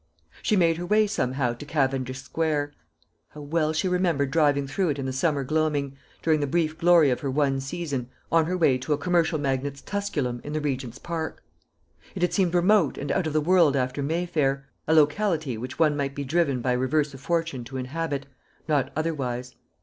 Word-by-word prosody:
She 215 - +2
made 165 -4 +3
her 175 - -4
way 215 +2 +4
somehow 130 - -1
to 120 - -9
Cavendish 135 -3 -1
square. 145 +1 -1 0.6
How 150 - -8
well 155 +1 0
she 160 +4 0
remembered 170 -7 +1
driving 145 -2 +3
through 175 +6 -1
it 145 - -1
in 135 - -3
the 130 - -2
summer 140 +1 +1
gloaming, 145 -1 0 0.3
during 160 -2 +3
the 145 - 0
brief 155 +1 0
glory 165 -4 +5
of 125 - 0
her 140 - -3
one 135 0 +1
season, 135 -3 -4 0.2
on 165 -1 +4
her 180 +1 -1
way 135 -7 +3
to 150 +4 -1
a - - 0
commercial 170 0 +1
magnate's 140 0 -2
Tusculum 145 -12 -3
in 150 - -6
the 155 - 0
Regent's 135 -4 -3
park! 165 0 -5 0.7
It 180 - -2
had 180 - +1
seemed 180 -3 +2
remote 200 +4 +3
and 140 0 -3
out 180 - +1
of 155 - -3
the 155 - +2
world 170 -3 +4
after 130 +1 -1
Mayfair 150 -3 0 0.2
a 160 - +3
locality 155 - +2
which 125 +4 -6
one 155 -2 +3
might 140 -1 -2
be 145 - -3
driven 140 -3 +1
by 125 +1 0
reverse 140 +3 +1
of 135 - -11
fortune 165 -5 -1
to 130 +2 -7
inhabit, 140 +2 -3 0.4
not 145 -4 +1
otherwise. 130 -6 -2
145 Hz, 195 wpm, -26 LUFS, 135-165 Hz, 0.7 s, glory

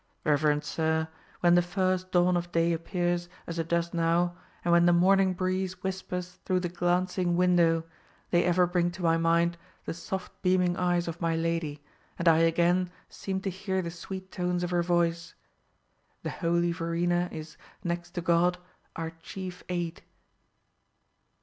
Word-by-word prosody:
"Reverend 150 0 +2
sir, 160 +1 0 0.3
when 175 -1 +5
the 175 - +6
first 185 +1 -1
dawn 180 0 +4
of 175 0 -2
day 170 0 +2
appears, 175 +1 -1 0.2
as 170 0 -5
it 165 - -2
does 170 0 0
now, 170 +1 +1 0.3
and 175 - +2
when 170 0 +5
the 175 - +5
morning 190 +1 +4
breeze 185 0 -2
whispers 180 -1 -4
through 185 -1 +1
the 175 - -2
glancing 175 0 0
window, 170 -2 +4 0.5
they 175 - +4
ever 180 0 +4
bring 175 0 +1
to 180 +1 -7
my 165 -1 +4
mind 170 +1 +2 0.3
the - - -3
soft 190 +2 -5
beaming 180 -1 +2
eyes 175 -1 +1
of 170 +1 -5
my 165 -1 +1
lady, 165 -3 -2 0.3
and 170 - -1
I 165 -1 +6
again 175 +2 +3 0.2
seem 190 -1 -4
to 195 - -2
hear 190 0 -2
the 170 - -4
sweet 190 +2 -8
tones 180 0 -1
of 175 - -2
her 175 -1 +2
voice. 170 -1 0 0.9
The - - -3
holy 170 0 +1
Verena 175 +1 0
is, 155 0 -8 0.3
next 175 0 -4
to 175 - -1
God, 175 +1 +3 0.4
our 165 0 -4
chief 185 0 -7
aid." 175 -2 -3
175 Hz, 160 wpm, -28 LUFS, 170-180 Hz, 0.9 s, the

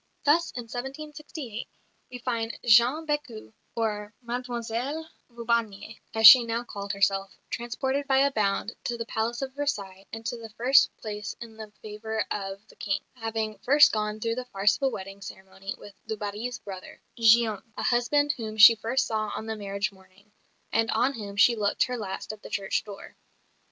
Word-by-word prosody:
Thus, 330 +4 +3
in 245 - -4
1768, 265 0 -7 0.4
we 250 - -7
find 235 -2 -3
Jeanne 240 +7 +5
Bécu 290 -8 -4 0.2
or 210 -2 -2
"Mademoiselle 245 +5 -3 0.2
Vaubarnier," 230 -3 -2 0.2
as 220 0 +3
she 240 +3 +12
now 230 +1 -2
called 200 -3 -5
herself 195 0 0
transported 265 +4 -2
by 270 -1 +3
a 280 +1 +4
bound 210 -1 0
to 240 - -2
the 230 - -4
Palace 235 +2 -2
of 265 -1 -5
Versailles 200 -10 -3
and 225 +1 -8
to 240 - -2
the 225 -1 -9
first 250 +5 +4
place 210 -1 -6
in 230 -2 -10
the 220 -1 -9
favour 220 +1 -3
of 195 +1 -5
the - - -17
King, 195 -1 -1
having 225 -3 -3
first 290 +3 +6
gone 210 0 -2
through 230 +1 -1
the 250 +1 -4
farce 200 -3 +2
of - - -33
a 270 - +3
wedding 195 -3 -8
ceremony 190 +1 -8
with 205 - -12
du 220 - -3
Barry's 210 +4 -4
brother, 190 -5 -10 0.2
Guillaume, 225 -2 +4 0.2
a - - -3
husband 290 +5 +2
whom 220 -2 -6
she 220 +2 +11
first 230 +4 0
saw 215 -2 -2
on - - -5
the 220 0 -3
marriage 200 -1 -3
morning, 190 +2 -22 0.4
and 225 0 +2
on 245 +5 +2
whom 205 -5 -7
she 235 +4 +5
looked 205 -2 +1
her 250 - -2
last 205 -2 -5
at 215 - -13
the - - -10
church 195 -1 -1
door. 200 -2 -10
225 Hz, 180 wpm, -27 LUFS, 210-245 Hz, 0.4 s, she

